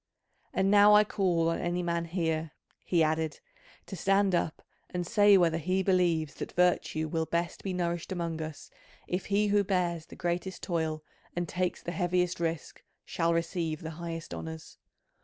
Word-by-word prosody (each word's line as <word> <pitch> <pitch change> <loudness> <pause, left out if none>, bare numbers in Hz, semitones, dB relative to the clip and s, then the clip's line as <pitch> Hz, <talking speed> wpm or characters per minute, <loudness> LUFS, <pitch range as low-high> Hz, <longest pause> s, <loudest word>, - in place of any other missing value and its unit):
And 190 +1 +1
now 205 0 +7
I 210 - +7
call 180 -6 +1
on 165 - -1
any 175 +1 -1
man 170 -1 -1
here," 160 -2 -2 0.3
he 170 -3 +2
added, 155 0 0 0.5
"to 195 - -7
stand 195 +2 +2
up 170 -2 -1 0.3
and 175 -1 -3
say 205 0 +6
whether 165 -2 +2
he 185 +4 0
believes 175 -5 +2
that - - -5
virtue 175 -3 +1
will 160 0 -1
best 170 0 -2
be 195 - -2
nourished 175 -1 -2
among 170 -3 -3
us 155 -2 -7 0.4
if 180 +1 -2
he 205 +1 +2
who 205 0 +3
bears 175 -4 -1
the - - -12
greatest 175 +2 -3
toil 160 -3 -2 0.3
and 175 0 -1
takes 180 +2 -2
the 175 - -3
heaviest 180 -1 0
risk 165 -3 -3 0.2
shall 165 0 0
receive 165 -1 -1
the 160 -1 -5
highest 165 - -5
honours. 80 -1 -8
175 Hz, 170 wpm, -29 LUFS, 165-185 Hz, 0.5 s, now